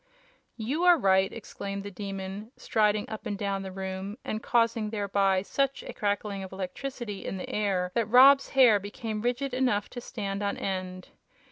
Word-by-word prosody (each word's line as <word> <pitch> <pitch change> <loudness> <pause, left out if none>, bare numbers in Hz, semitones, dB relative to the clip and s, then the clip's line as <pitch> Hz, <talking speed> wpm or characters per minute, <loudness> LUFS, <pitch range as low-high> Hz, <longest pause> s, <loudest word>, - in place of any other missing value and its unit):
"You 265 +10 -2
are 355 -1 +7
right!" 190 -5 +3
exclaimed 200 -3 -6
the 205 - -7
Demon, 195 +2 -6
striding 210 -1 +1
up 220 - -6
and 205 - -3
down 195 -1 -2
the 190 -1 -6
room, 190 +2 -5
and 215 - -3
causing 230 -2 +1
thereby 200 -3 +1
such 275 +5 -1
a - - -7
crackling 205 -1 -2
of 190 - -7
electricity 205 +3 -5
in 195 - -4
the 180 - -6
air 190 -4 0
that 230 -2 +1
Rob's 270 +3 +7
hair 235 -6 +7
became 215 +1 -5
rigid 250 +3 -1
enough 245 -6 +1
to 245 - -6
stand 200 -4 -4
on 200 0 -1
end. 185 -1 -4
205 Hz, 170 wpm, -28 LUFS, 195-235 Hz, -, are